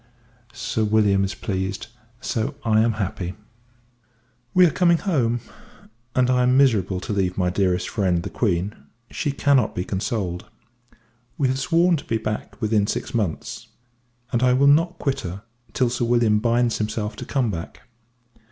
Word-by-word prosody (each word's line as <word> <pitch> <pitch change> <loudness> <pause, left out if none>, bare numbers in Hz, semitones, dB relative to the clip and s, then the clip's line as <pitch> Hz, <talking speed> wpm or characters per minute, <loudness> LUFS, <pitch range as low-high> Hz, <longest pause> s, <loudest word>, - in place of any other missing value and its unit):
Sir 115 -1 -2
W. 105 -2 +3
is 95 -2 -1
pleased, 95 0 -3 0.3
so 115 -3 -2
I 110 -1 +4
am 115 0 +2
happy. 95 -3 -4 1.2
We 180 0 +6
are 165 - +3
coming 170 0 +3
home; 125 - 0 0.7
and 125 -1 +3
I 125 0 +2
am 125 +1 +3
miserable, 105 -9 +3
to 105 - -4
leave 95 -2 0
my 90 -2 +1
dearest 90 -2 0
friend, 90 -5 0
the - - -6
Q. 95 -3 0 0.4
She 145 - -1
cannot 135 -4 +2
be 90 - -2
consoled. 95 -3 -3 0.9
We 140 -5 +2
have 130 +1 -1
sworn 165 +6 +3
to - - -9
be 115 - 0
back 110 -1 -4
in 105 -2 +2
six - - -3
months; 105 -9 -3 0.6
and 120 -2 +1
I 125 -1 +4
will 135 +2 +3
not 165 +5 +4
quit 135 -1 -1
her, 95 +4 -6 0.3
till 125 -2 +1
Sir 120 -1 -1
William 115 -3 +3
binds 120 +1 +1
himself 105 0 -2
to - - -6
come 125 -6 0
back. 85 -3 -7
110 Hz, 160 wpm, -23 LUFS, 95-130 Hz, 1.2 s, We